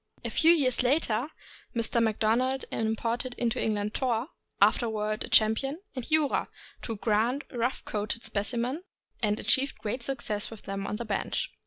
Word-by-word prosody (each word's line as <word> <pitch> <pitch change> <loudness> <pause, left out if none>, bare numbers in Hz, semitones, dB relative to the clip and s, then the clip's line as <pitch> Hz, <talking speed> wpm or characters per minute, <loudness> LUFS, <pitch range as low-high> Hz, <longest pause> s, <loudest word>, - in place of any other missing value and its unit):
A - - -2
few 325 +1 +5
years 265 -8 +3
later, 250 -2 +2 0.5
Mr. 230 0 +1
Macdona 230 +4 +2
imported 230 +3 -1
into 235 -2 -1
England 210 -1 -1
Thor, 250 +1 0 0.3
afterward 215 -2 +2
a - - -12
champion, 250 +8 +4 0.2
and 255 +1 -5
Jura, 310 -3 +3 0.3
two 225 - -4
grand 225 +6 +1
rough 245 +1 -2
coated 210 +2 -2
specimens, 240 - -1 0.4
and 210 -2 +1
achieved 265 +5 +1
great 220 +4 -3
success 235 -5 -2
with 225 -3 -11
them 195 0 -4
on - - -2
the 235 - -4
bench. 205 -3 -2
230 Hz, 150 wpm, -28 LUFS, 215-255 Hz, 0.5 s, few